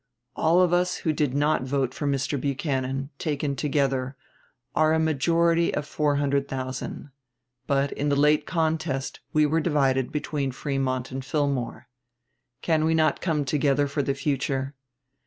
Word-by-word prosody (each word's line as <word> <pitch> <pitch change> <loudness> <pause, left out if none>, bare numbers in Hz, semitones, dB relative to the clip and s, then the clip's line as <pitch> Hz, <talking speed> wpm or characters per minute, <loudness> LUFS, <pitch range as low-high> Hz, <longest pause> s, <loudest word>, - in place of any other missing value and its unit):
All 170 +3 +3
of 180 -1 +3
us 180 +1 +2
who 160 - +2
did 145 -3 0
not 145 0 +2
vote 130 -1 -1
for 145 - -3
Mr. 140 0 -1
Buchanan, 135 -1 -2
taken 145 -2 -1
together, 135 -1 0 0.6
are 155 0 +3
a - - +2
majority 165 +2 +2
of - - -2
four 150 0 0
hundred 140 -1 +1
thousand. 130 +1 -5 0.6
But 140 0 +1
in 145 +1 -1
the 140 - +2
late 150 +2 +3
contest 160 -5 -1
we 155 0 +4
were 160 +2 +1
divided 135 -5 +1
between 145 -3 -2
Frémont 130 -2 -2
and 130 +1 -4
Fillmore. 135 -3 -2 0.8
Can 160 -2 +2
we 160 +1 +2
not 155 -2 +2
come 155 -5 0
together 145 0 +2
for 145 +1 -1
the 140 0 -1
future? 135 -1 -1
145 Hz, 155 wpm, -25 LUFS, 135-155 Hz, 0.8 s, we